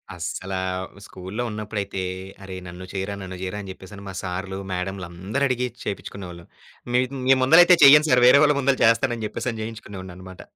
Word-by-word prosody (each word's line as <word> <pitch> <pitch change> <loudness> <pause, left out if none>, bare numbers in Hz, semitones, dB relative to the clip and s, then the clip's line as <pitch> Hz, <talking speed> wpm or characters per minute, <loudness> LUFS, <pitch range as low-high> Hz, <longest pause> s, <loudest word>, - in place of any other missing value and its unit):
అస్సలా 95 +3 -4 0.4
వు 100 - -14
స్కూల్లో 95 +6 -6
ఉన్నప్పుడయితే, 105 -2 -4 0.4
అరె 95 -1 -8
నన్ను 90 +1 -9
చేయరా, 95 +1 -3
నన్ను 95 -1 -7
జేయరా, 95 +2 -4
అని 100 - -9
జెప్పేసని 95 +2 -12
మా 95 - -6
సార్లు, 95 +1 -4
మేడమ్లందరడిగి 95 +8 -2 0.2
చేపిచ్చుకునేవాళ్ళు. 90 -4 -7 0.5
మీద్ 130 +2 +1
మీ 135 - +7
ముందలయితే 175 +5 +7
చెయ్యను 150 +2 +8
సారు, 125 -1 +4
వేరే 140 - +8
వాళ్ళ 150 -1 +4
ముందల 135 -1 +2
చేస్తానని 115 0 +2
జెప్పేసని 110 +1 -4
జేయించుకునేవాడినన‌మాట. 95 -4 -9
100 Hz, 150 wpm, -23 LUFS, 95-125 Hz, 0.5 s, చెయ్యను